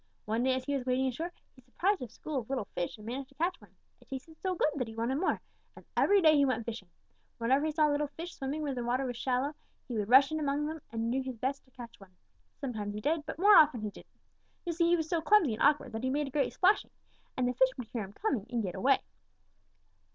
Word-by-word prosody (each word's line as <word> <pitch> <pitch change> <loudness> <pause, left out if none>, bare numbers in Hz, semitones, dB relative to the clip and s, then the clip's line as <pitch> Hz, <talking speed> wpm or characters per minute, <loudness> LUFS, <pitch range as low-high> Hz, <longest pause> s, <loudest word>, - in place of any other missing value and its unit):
One 220 +2 0
day 260 +1 +2
as 260 0 -4
he 285 - -1
was 270 - -2
wading 260 +1 +1
ashore, 325 +8 -4 0.2
he 255 - -18
surprised 360 +10 0
a 250 - -4
school 295 +4 -4
of 225 - -9
little 265 -6 -1
fish 175 - -3
and 210 - -13
managed 260 +3 -5
to 275 - -23
catch 345 +5 -1
one. - - -19 0.2
It - - -22
tasted 275 +5 -8
so 375 -1 -1
good 310 - +2
that 250 -4 -1
he 220 - -9
wanted 240 +5 -1
more, 370 - +1 0.4
and - - -14
every 400 -2 +4
day 310 -1 +7
he 285 - +5
went 255 -4 0
fishing. 220 -6 -6 0.5
Whenever 265 +6 +2
he - - 0
saw 305 0 +3
little 295 0 0
fish 330 +4 -8
swimming 280 +3 -4
where 285 -2 -1
the 245 -2 -3
water 250 +3 0
was 245 -1 -3
shallow, 260 +4 -1 0.3
he 250 - -5
would 210 -2 -2
rush 270 +4 +7
in 315 - -1
among 290 0 0
them 315 0 -5
and 230 0 -2
do 265 +2 +1
his 260 -2 -6
best 265 +4 -2
to - - -26
catch 235 -2 -10
one. 190 -2 -17 0.4
Sometimes 210 -6 -4
he - - -3
did, 300 +4 0
but - - -5
more 405 +4 +7
often 295 -7 +6
he 210 -1 -3
didn't. - - -17 0.5
You 345 - -1
see, 335 +1 +2
he 345 - +5
was 320 -2 -2
so 330 0 0
clumsy 320 - +4
and 215 - -6
awkward 290 -4 +3
that 225 0 -4
he 260 - +1
made 290 +2 0
a 275 - -7
great 285 +1 +1
splashing, 390 +3 +3 0.5
and 250 -1 +1
the 250 - 0
fish 260 +1 +4
would 240 -3 -7
hear 230 -4 -3
him 195 +1 -10
coming 255 - -2
and 235 -2 -1
get 185 -3 -3
away. 265 +8 +3
265 Hz, 265 wpm, -31 LUFS, 240-305 Hz, 0.5 s, day